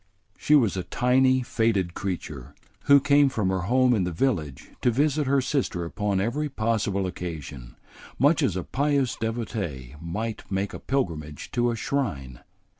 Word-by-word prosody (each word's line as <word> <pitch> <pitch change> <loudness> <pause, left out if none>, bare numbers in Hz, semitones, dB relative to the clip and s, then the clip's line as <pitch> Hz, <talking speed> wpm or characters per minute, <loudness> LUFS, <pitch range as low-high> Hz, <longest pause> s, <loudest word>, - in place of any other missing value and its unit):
She 150 - +3
was 115 -10 +3
a 95 - -1
tiny, 130 +3 +2
faded 110 -7 0
creature, 75 -8 -5 0.3
who 140 0 +7
came 140 0 +4
from 105 -7 -1
her 95 - 0
home 130 0 +4
in 105 -5 +1
the 90 - -2
village 80 - -2
to - - +3
visit 145 +3 +1
her 140 0 +3
sister 130 - -1
upon 100 +2 -1
every 135 +9 -1
possible 110 -5 0
occasion, 75 -9 -7 0.4
much 150 +4 +4
as 115 - +1
a 95 - -2
pious 140 -2 0
devotee 105 - -4
might 105 +4 -5
make 95 +1 -1
a - - -6
pilgrimage 80 - -3
to 120 0 +1
a 120 - -1
shrine. 100 - -3
110 Hz, 160 wpm, -25 LUFS, 90-130 Hz, 0.4 s, who